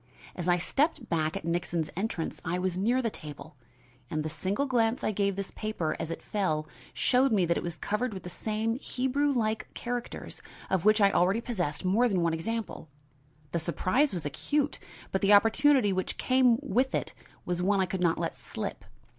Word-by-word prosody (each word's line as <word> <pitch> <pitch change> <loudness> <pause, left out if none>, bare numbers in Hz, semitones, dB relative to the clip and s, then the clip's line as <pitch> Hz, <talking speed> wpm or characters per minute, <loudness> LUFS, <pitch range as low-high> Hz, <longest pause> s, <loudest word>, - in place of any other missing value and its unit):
As 175 -1 -4
I 175 0 +4
stepped 270 - 0
back 155 -1 0
at - - -7
Nixon's 170 -1 -1
entrance 190 -3 -3
I 170 +2 -1
was 180 -1 -1
near 235 +7 +1
the 230 - 0
table 150 -2 -9 0.5
and 155 0 -1
the 155 - -3
single 190 - -1
glance 240 -2 +1
I - - +1
gave 200 -1 0
this 195 0 -4
paper 215 -7 -2
as 160 - -3
it 165 - -5
fell 155 -7 -1 0.2
showed 255 +1 +3
me 195 -5 +3
that 170 0 +1
it - - -1
was 170 -1 -4
covered 230 +4 -1
with 190 -4 -7
the 180 - -6
same 220 +4 -2
Hebrew 275 +2 0
like 220 -4 -1
characters 245 0 -5 0.3
of 190 -2 +1
which 215 0 +5
I 200 0 +6
already 190 +5 +3
possessed 185 - -2
more 225 +7 +3
than 190 -4 +1
one 170 -1 +2
example. 210 -1 -4 0.6
The 170 - 0
surprise 185 - +1
was 175 -5 -4
acute, 285 - -1 0.3
but 190 - 0
the 200 +1 +5
opportunity 225 +1 +5
which 185 0 -2
came 255 -2 +4
with 260 +1 +1
it - - -2 0.3
was 175 0 -1
one 195 +2 +2
I 190 - +3
could 185 +1 -4
not 170 -2 +3
let - - -2
slip. - - -6
200 Hz, 195 wpm, -29 LUFS, 175-235 Hz, 0.6 s, I